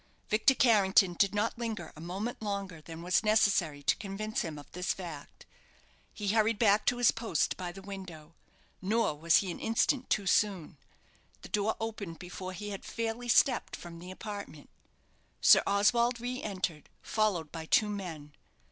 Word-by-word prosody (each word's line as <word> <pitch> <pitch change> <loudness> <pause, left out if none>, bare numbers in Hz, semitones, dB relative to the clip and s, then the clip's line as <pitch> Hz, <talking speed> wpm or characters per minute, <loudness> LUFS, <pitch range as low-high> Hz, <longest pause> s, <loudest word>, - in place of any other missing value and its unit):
Victor 220 +5 +4
Carrington 200 -6 +4
did 200 +3 +2
not 225 +3 -1
linger 220 -8 -4
a 155 - -11
moment 195 +9 -4
longer 200 -6 -4
than 165 +1 -9
was 180 +4 +2
necessary 195 -9 +2
to - - +3
convince 215 +1 -3
him 160 -3 -5
of 145 - -10
this 180 +1 -1
fact. 165 -6 -9 0.7
He 205 -2 -4
hurried 220 +1 +2
back 210 -1 +3
to 245 - +3
his 245 -1 +5
post 225 -9 -1
by 180 -2 -5
the 195 +2 -11
window: 180 -5 -9 0.5
nor 215 -1 +1
was 160 +2 +2
he 190 -3 0
an - - -7
instant 245 +3 +1
too 200 - +1
soon. 190 -6 +1 0.7
The - - -9
door 210 +1 0
opened 210 -7 -5
before 185 +1 -7
he 205 +3 -6
had 195 - -6
fairly 230 +1 -4
stepped 245 +1 +3
from 170 -1 -10
the 180 +2 -10
apartment. 200 -6 -8 0.7
Sir - - +7
Oswald 235 +4 +3
re 250 +2 -4
entered, 185 -6 -4
followed 195 -8 0
by 160 -1 -7
two 215 - +4
men. 170 -8 -6
200 Hz, 165 wpm, -31 LUFS, 175-220 Hz, 0.7 s, Sir